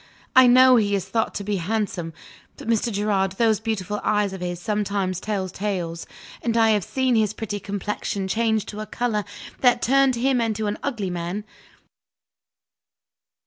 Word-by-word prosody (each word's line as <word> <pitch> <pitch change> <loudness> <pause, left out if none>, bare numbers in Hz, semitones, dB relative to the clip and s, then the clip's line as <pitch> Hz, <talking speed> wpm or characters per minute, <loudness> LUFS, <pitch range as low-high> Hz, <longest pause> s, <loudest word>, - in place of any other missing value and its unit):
I 260 -1 +8
know 255 +1 +7
he 205 -2 +2
is 195 - -3
thought 225 -1 -1
to 200 - -3
be 205 0 -1
handsome 185 -2 -2 0.5
but, - - -10
Mr. 230 +1 +1
Gerard, 200 -2 0
those 220 0 +2
beautiful 210 -2 -3
eyes 210 -2 +1
of 190 - -7
his 175 -1 -3
sometimes 200 -2 -1
tell 200 -2 -2
tales; 180 -3 -4 0.3
and 235 -1 0
I 225 -1 +5
have 210 -3 +2
seen 260 +6 0
his 215 -2 +2
pretty 205 -2 -4
complexion 200 0 -3
change 220 +1 +1
to 210 - -8
a 215 - -5
color 220 -1 -1 0.4
that 245 -2 +3
turned 270 0 +4
him 250 +1 +1
into 220 -1 -1
an 205 0 -2
ugly 220 -9 -3
man. 175 +4 -4
210 Hz, 165 wpm, -23 LUFS, 195-230 Hz, 0.5 s, I